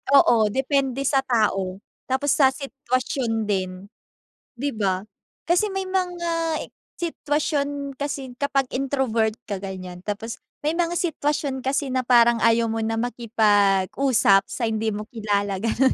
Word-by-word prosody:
Oo, 230 -5 +6
depende 270 +3 0
sa 275 0 +3
tao, 205 -7 0 0.2
tapos 265 +2 +1
sa 275 - +5
sitwasyon 255 -3 -2
din, 190 -3 -1 0.8
di 275 +4 -2
ba? 195 -6 -1 0.5
Kasi 355 +4 +4
may 385 -1 -3
mga 340 -3 -1
e - - -8 0.3
sitwasyon 285 -3 -2
kasi 270 -3 -4
kapag 275 -1 0
introvert 255 -5 0 0.2
ka, 200 - -2
ganyan. 185 -2 -7
Tapos 220 +2 -4 0.2
may 300 +2 0
mga 345 -1 +1
sitwasyon 290 -5 -1
kasi 275 +1 0
na 255 0 +1
parang 235 -1 +5
ayaw 230 0 +4
mo 225 - -2
na 225 0 -1
makipag-usap 215 -2 +3
sa 235 - -3
hindi 220 0 -1
mo 210 +1 -5
kilala, 205 -3 -1
gano'n. 230 +4 +2
255 Hz, 135 wpm, -23 LUFS, 215-280 Hz, 0.8 s, Oo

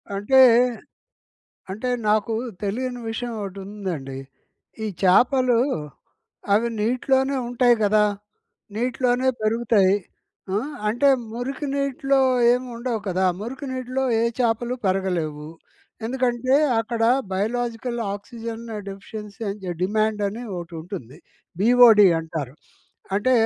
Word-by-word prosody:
అంటే 235 +7 +3 1.3
అంటే 220 +6 -3 0.2
నాకు 215 +1 +2 0.3
తెలియని 245 +4 -3
విషయం 240 +2 -4
ఒకటి 195 -1 -6
ఉందండి. 175 -10 -5 0.7
ఈ - - -1 0.2
చాపలు 245 +5 +4 1.0
అవి 230 +3 +2
నీటిలోనే 265 +4 +1
ఉంటాయి 245 0 +3
కదా! 210 +1 +4 0.7
నీటిలోనే 250 +2 0
పెరుగుతాయి. 215 -3 +3 0.6
ఆ! - - +2 0.3
అంటే 240 +6 +2 0.3
మురికి 265 +4 -4
నీటిలో 275 0 +1 0.3
ఏమి 250 +1 0
ఉండవు 235 -1 -2
కదా! 185 +1 +1 0.2
మురికి 260 +6 -6
నీటిలో 255 +1 -2 0.2
ఏ - - +2 0.2
చాపలు 240 +1 0
పెరగలేవు. 175 -6 -1 0.6
ఎందుకంటే 255 +1 +1 0.2
అక్కడ 225 0 -3 0.3
బయోలాజికల్ 235 +4 -2 0.2
ఆక్సిజన్ 230 +2 -7 0.3
డెఫిషియన్సీ 205 +2 -9
అని 205 +1 -5
జ 180 - -2
డిమాండ్ 215 +2 0
అని 215 +4 -6 0.2
ఒకటి 170 0 -8
ఉంటుంది. 155 - -8 0.4
బిఓడి 230 -3 +7
అంటారు. 160 -5 -5 0.6
అంటే 220 +6 +1
225 Hz, 105 wpm, -23 LUFS, 200-250 Hz, 1.3 s, బిఓడి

